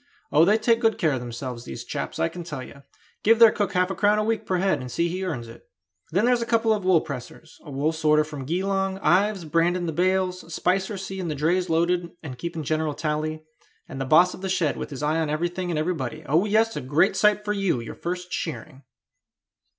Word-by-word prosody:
Oh, 155 +3 +6
they 210 +4 +4
take 230 +1 +2
good 225 -2 +2
care 160 -4 +2
of 130 - -1
themselves, 120 0 -6
these 65 - -7
chaps, - - -5
I 80 - +1
can 175 - -7
tell 150 -6 -6
you; 140 - -13 0.4
give 225 +2 +5
their 230 -1 +8
cook 205 -3 -2
half 180 0 +1
a - - -3
crown 210 +1 +3
a 215 - +1
week 225 +1 -1
per 185 - +1
head, 190 -5 +1
and 125 -1 -7
see 170 +7 0
he 185 +2 -3
earns 140 -11 -4
it. 115 - -14 0.4
Then 190 +7 +2
there's 245 -1 +3
a - - -1
couple 225 -1 +3
of 210 -2 -2
wool 185 -3 +4
pressers, 140 +3 -9
a 150 - -11
wool 145 +3 0
sorter 155 -1 +3
from 150 -3 -7
Geelong, 190 +4 -1
Ives 195 0 +2
branding 170 +3 +1
the 165 - -2
bales, 185 0 0
Spicer 190 +5 0
seeing 190 -1 -5
the 155 - -2
drays 175 +5 +1
loaded 170 +1 +1
and 130 -5 -8
keeping 165 0 -4
general 155 0 -1
tally, 155 0 -2 0.4
and 135 - -6
the - - -1
boss 175 +6 +5
of - - -10
the 190 - -3
shed 180 -6 +1
with - - -5
his 145 -1 -6
eye 155 +2 +1
on 160 -2 -1
everything 175 +4 -2
and 165 - -1
everybody. 155 -6 -2
Oh, 165 +7 +2
yes, 220 +2 +2
a - - -3
great 145 +9 +2
sight 210 0 +3
for 210 - 0
you 195 -10 0
your 115 - -7
first 180 +1 -5
shearing!" 155 -4 -5
170 Hz, 230 wpm, -25 LUFS, 150-190 Hz, 0.4 s, their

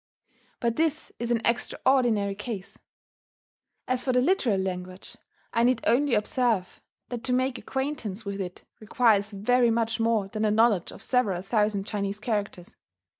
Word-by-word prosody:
But 235 -1 -1
this 315 -1 0
is 235 0 -3
an 235 -1 +1
extraordinary 235 -3 +1
case.... 210 -1 -6 1.1
As 255 0 0
for 260 - +1
the 250 - +3
literary 255 - +2
language, 185 0 -5 0.4
I 230 - +2
need 245 -1 +3
only 270 +2 +3
observe 220 -4 0 0.3
that 245 -1 -5
to 255 - -1
make 255 0 0
acquaintance 265 -7 -4
with 200 0 -4
it 180 -1 -7 0.2
requires 215 -2 +2
very 235 +4 +2
much 230 0 0
more 225 -3 +1
than 215 +2 -4
a 215 - +3
knowledge 215 -4 +3
of - - -10
several 205 -8 +1
thousand 210 -1 0
Chinese 200 -1 -3
characters. 205 -5 -3
225 Hz, 150 wpm, -27 LUFS, 200-250 Hz, 1.1 s, the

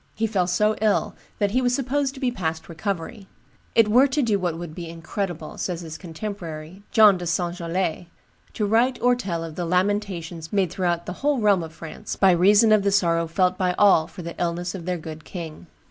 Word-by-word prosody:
He 225 - 0
fell 195 -5 0
so 210 +4 +2
ill 215 -2 +1 0.2
that 205 -1 +1
he 255 +4 +2
was 245 0 +2
supposed 275 +1 -1
to - - -9
be 255 -2 0
past 160 -7 -3
recovery. 195 +4 -5 0.5
"It 225 -2 +6
were 250 +6 +5
to 280 +1 0
do 215 -4 +1
what 175 -3 -2
would 170 -2 -7
be 170 0 -7
incredible," 165 0 -5
says 175 -2 -3
his 160 -2 -8
contemporary, 170 -1 -7
John 210 -4 +6
de 175 - -4
St. 175 +1 -1
Gelais, 175 0 -2 0.5
"to 210 - -1
write 235 +5 +2
or 245 0 +3
tell 175 -9 -3
of 165 -1 -7
the 175 - -4
lamentations 180 -3 -1
made 195 -5 +1
throughout 175 -2 -1
the 180 - -4
whole 290 0 +2
realm 205 -4 +3
of 160 -1 -7
France, 165 0 -7
by 195 -1 +5
reason 205 +5 +5
of 215 -1 +5
the 200 0 +1
sorrow 170 -4 +2
felt 180 +2 +1
by 180 -1 +1
all 190 -6 +5
for 175 +1 -10
the 170 0 -6
illness 175 +1 -2
of 180 -4 -7
their 180 0 -1
good 160 -1 -8
king. 170 -2 -8
180 Hz, 210 wpm, -24 LUFS, 170-210 Hz, 0.5 s, It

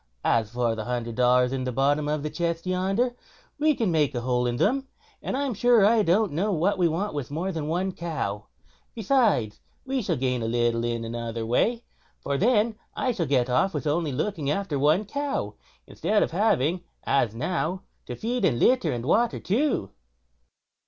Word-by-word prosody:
As 110 -2 +2
for 120 0 0
the 110 -1 -5
hundred 120 -1 -3
dollars 125 +1 +3
at 130 -1 -2
the 125 - -2
bottom 145 +4 +1
of 150 -1 -1
the 150 - -2
chest 170 +2 -2
yonder, 195 +7 0 0.4
we 305 0 +3
can't 225 -7 0
make 150 -4 +1
a 120 - -1
hole 125 0 0
in 120 - -1
them, 255 - +1 0.3
and - - -3
I'm 280 -2 -1
sure 230 0 +4
I 225 +1 +4
don't 200 +2 +2
know 190 +8 0
what 185 +3 +1
we 175 - +4
want 170 +5 -2
with 145 -4 -4
more 170 +6 -2
than 160 -4 -4
one 180 +4 -1
cow. 130 - -4 0.5
Besides, 215 - +1 0.3
we 265 0 -1
shall 185 -6 -1
gain 125 -1 -1
a 115 - -2
little 120 0 +1
in 115 -1 -2
another 115 0 -4
way, 230 - +1 0.4
for 140 - -2
then 220 - +2 0.2
I 260 - 0
shall 180 -9 -2
get 130 -3 +2
off 190 +10 +1
with - - -3
only 155 0 0
looking 155 +1 -2
after 155 -3 -1
one 155 +9 +3
cow, 285 +6 -3 0.3
instead 210 0 0
of - - -3
having, 175 - +1 0.2
as 120 -5 +1
now, 180 - -2 0.2
to - - -5
feed 240 +3 -2
and 120 - +3
litter 255 - +3
and 120 -1 -4
water 230 - +2
two." 225 - 0
160 Hz, 190 wpm, -26 LUFS, 125-210 Hz, 0.5 s, sure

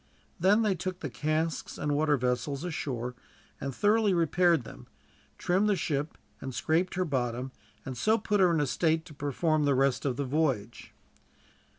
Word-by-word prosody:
Then 200 +6 +4
they 210 -3 +2
took 185 +1 -5
the 145 - -4
casks 155 +6 -2
and 145 - -1
water 150 0 +2
vessels 125 +4 -1
ashore 125 -8 -3 0.5
and 135 - -3
thoroughly 205 - +2
repaired 170 -2 +3
them, - - -12 0.5
trimmed 190 +4 +1
the 205 - +3
ship 150 -2 -2 0.2
and 130 -2 -6
scraped 170 +4 0
her 185 0 0
bottom, 130 -3 -2 0.3
and 130 - -5
so 215 - +2
put 210 -1 0
her 185 -2 +5
in 165 - +2
a - - +2
state 160 +3 +1
to 165 - -12
perform 150 +2 0
the 140 -1 +3
rest 135 0 +2
of 135 -3 0
the 140 - -1
voyage. 130 -6 -1
155 Hz, 175 wpm, -29 LUFS, 135-180 Hz, 0.5 s, her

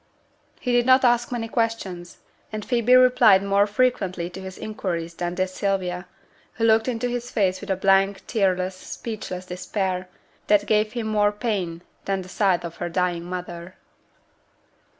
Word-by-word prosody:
He 250 - -2
did 245 0 +3
not 260 0 +6
ask 240 0 +2
many 235 -2 -2
questions, 220 -7 -3 0.3
and 215 -1 -5
Phoebe 245 0 +3
replied 245 -6 +6
more 200 +1 +3
frequently 200 -6 0
to 190 - -8
his 190 0 -8
inquiries 170 -6 -4
than 175 +1 -3
did 185 +1 0
Sylvia, 185 -2 -2 0.5
who 230 - -4
looked 220 0 +4
into 245 -1 -1
his 245 0 -4
face 190 -5 0
with 205 - -9
a 190 - +2
blank, 195 +1 +2
tearless, 185 -3 0
speechless 185 -2 -6
despair, 185 0 -3 0.4
that 205 -1 +4
gave 215 0 +1
him 235 -2 -3
more 210 -1 +2
pain 200 -6 -3 0.2
than 195 -1 -1
the 180 - -13
sight 190 -3 +1
of 170 -1 -7
her 175 - -3
dying 175 -1 -1
mother. 180 0 -7
195 Hz, 160 wpm, -24 LUFS, 180-225 Hz, 0.5 s, not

